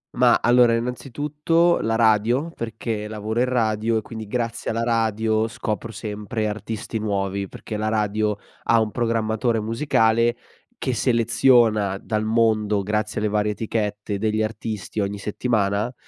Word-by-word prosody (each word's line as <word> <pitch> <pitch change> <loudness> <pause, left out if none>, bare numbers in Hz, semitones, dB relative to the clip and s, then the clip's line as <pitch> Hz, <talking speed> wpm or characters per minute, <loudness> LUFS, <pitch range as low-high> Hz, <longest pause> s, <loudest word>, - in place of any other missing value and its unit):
Ma - - +5
allora, 120 -1 +5
innanzitutto 150 +7 0
la 115 0 0
radio 115 +7 +3
perché 110 -1 -4
lavoro 110 +2 -3
in 125 - +4
radio 115 -2 0
e - - 0
quindi 110 -1 -8
grazie 115 0 -3
alla 115 +1 -1
radio 110 -1 +1
scopro 110 0 -4
sempre 105 +1 -3
artisti 110 +1 -4
nuovi, 100 -2 -2
perché 105 - -7
la 110 0 -1
radio 105 -1 0 0.3
ha 115 -1 +4
un 110 -1 -1
programmatore 115 0 0
musicale 115 -1 +2 0.4
che 130 - -2
seleziona 115 -4 +3
dal 110 -1 -2
mondo 110 -2 +2
grazie 105 +1 -1
alle 105 - +1
varie 105 0 +1
etichette 105 -2 -3
degli 110 +1 0
artisti 110 -1 -4
ogni 100 0 -1
settimana, 105 +1 0
110 Hz, 140 wpm, -23 LUFS, 105-115 Hz, 0.4 s, Ma